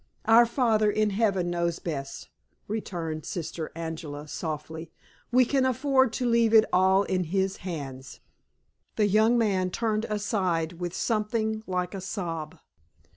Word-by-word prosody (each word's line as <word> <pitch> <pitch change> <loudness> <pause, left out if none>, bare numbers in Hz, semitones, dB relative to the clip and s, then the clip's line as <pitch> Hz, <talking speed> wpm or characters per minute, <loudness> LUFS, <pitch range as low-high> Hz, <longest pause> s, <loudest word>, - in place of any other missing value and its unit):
"Our 230 +2 +6
Father 225 -4 +2
in 215 0 +1
Heaven 195 -4 +1
knows 170 -1 -1
best," 140 -5 -6 0.4
returned 170 -7 -4
Sister 165 -2 -5
Angela, 160 -3 -6
softly; 160 +1 -5 0.4
"we 250 +1 +5
can 270 +2 +1
afford 260 0 +2
to 250 - -2
leave 230 -1 +3
it 220 - +8
all 190 +2 +4
in 185 -2 -1
His 190 +3 -1
hands." 135 -7 -7 0.8
The 210 - +3
young 215 +4 +4
man 195 -5 +1
turned 220 +2 -1
aside 185 -6 -1
with 175 0 -4
something 220 0 -1
like 180 0 -2
a 195 - -5
sob. 170 -5 -5
190 Hz, 135 wpm, -27 LUFS, 165-220 Hz, 0.8 s, it